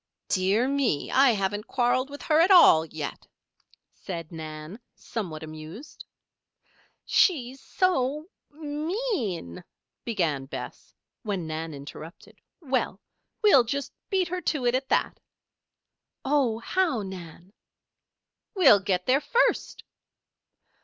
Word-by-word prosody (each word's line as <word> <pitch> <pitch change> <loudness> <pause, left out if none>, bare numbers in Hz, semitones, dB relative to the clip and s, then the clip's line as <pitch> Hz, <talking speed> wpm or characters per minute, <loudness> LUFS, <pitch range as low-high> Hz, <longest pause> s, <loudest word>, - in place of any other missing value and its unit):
"Dear 195 +6 +2
me! 270 - 0
I 270 0 +5
haven't 205 +1 -2
quarreled 255 +1 +1
with 285 0 -9
her 310 0 +3
at 340 +4 +5
all, 165 - +7
yet," 155 -2 -7 0.7
said 170 -3 -7
Nan, 155 +4 -8 0.2
somewhat 170 -9 -6
amused. 155 - -10 1.0
"She's 270 -7 +2
so 300 -5 0 0.2
mean," 295 - -3 0.4
began 165 - -1
Bess, - - -8 0.3
when 200 -7 -3
Nan 160 0 -5
interrupted: 145 +4 -11 0.2
"Well! 265 -4 -1 0.4
we'll 280 - +7
just 280 +4 -4 0.2
beat 375 -3 +1
her 365 +1 -3
to 295 -6 -1
it 240 - +3
at 265 +1 -1
that!" - - 0 1.1
"Oh, 265 -5 +2
how, 295 - 0
Nan?" 180 0 -10 1.0
"We'll 275 - +7
get 185 -2 -1
there 265 +3 +3
first." 480 +10 0
240 Hz, 110 wpm, -26 LUFS, -, 1.1 s, all